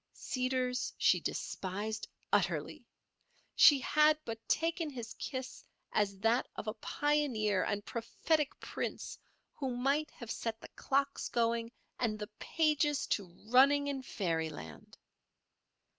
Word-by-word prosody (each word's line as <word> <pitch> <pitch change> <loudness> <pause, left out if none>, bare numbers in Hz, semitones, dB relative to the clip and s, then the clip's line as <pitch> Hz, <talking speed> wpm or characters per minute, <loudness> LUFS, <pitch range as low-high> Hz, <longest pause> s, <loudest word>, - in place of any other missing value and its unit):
Seeders 255 -1 -1
she - - +4
despised 205 +4 -3 0.3
utterly; - - 0 0.7
she 290 - +8
had 300 +3 +4
but 225 -1 -4
taken 330 0 +1
his 240 -5 -7
kiss 260 -2 -6 0.3
as 200 -2 +1
that 225 +3 +3
of - - -5
a 215 - -2
pioneer 245 -10 +1
and 205 0 -2
prophetic 280 +6 -1
prince - - -4 0.3
who 260 -4 -3
might 280 +4 +1
have 235 -2 -8
set 225 -1 -3
the - - -11
clocks 280 +1 -1
going 230 0 +1 0.3
and 220 -3 0
the 210 -1 -6
pages 300 -2 +1
to 200 -3 0 0.2
running 280 +3 +6
in 280 -2 -2
fairyland. 160 - -4
250 Hz, 120 wpm, -33 LUFS, 215-285 Hz, 0.7 s, she